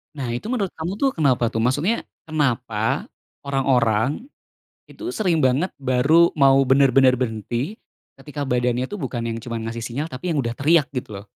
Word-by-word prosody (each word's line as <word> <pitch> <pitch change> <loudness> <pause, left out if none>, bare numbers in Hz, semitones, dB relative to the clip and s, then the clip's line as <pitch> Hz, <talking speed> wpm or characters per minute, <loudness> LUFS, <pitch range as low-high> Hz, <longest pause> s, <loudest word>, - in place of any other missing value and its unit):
Nah, 135 -4 -4
itu 120 +1 -4
menurut 220 -4 -1
kamu 165 +3 -3
tuh 275 - +4
kenapa 130 -6 +2
tuh? 110 - -5
Maksudnya, 145 - 0 0.2
kenapa 120 -7 -1 0.3
orang-orang, 135 - 0 0.6
itu 350 +2 -6
sering 180 -6 +1
banget 135 +9 +2
baru 140 +6 +3
mau 135 -3 +5
bener-bener 135 -1 +5
berhenti, 120 - -3 0.4
ketika 145 +1 -8
badannya 125 -1 0
tuh 205 - -5
bukan 130 - -4
yang 115 - -3
cuma 115 0 -5
ngasih 115 +1 -5
sinyal, 140 +6 -3
tapi 165 +6 -4
yang 145 - +1
udah 115 -1 -4
teriak 150 +1 +3
gitu 110 -7 -6
loh? - - -17
135 Hz, 165 wpm, -22 LUFS, 120-155 Hz, 0.6 s, mau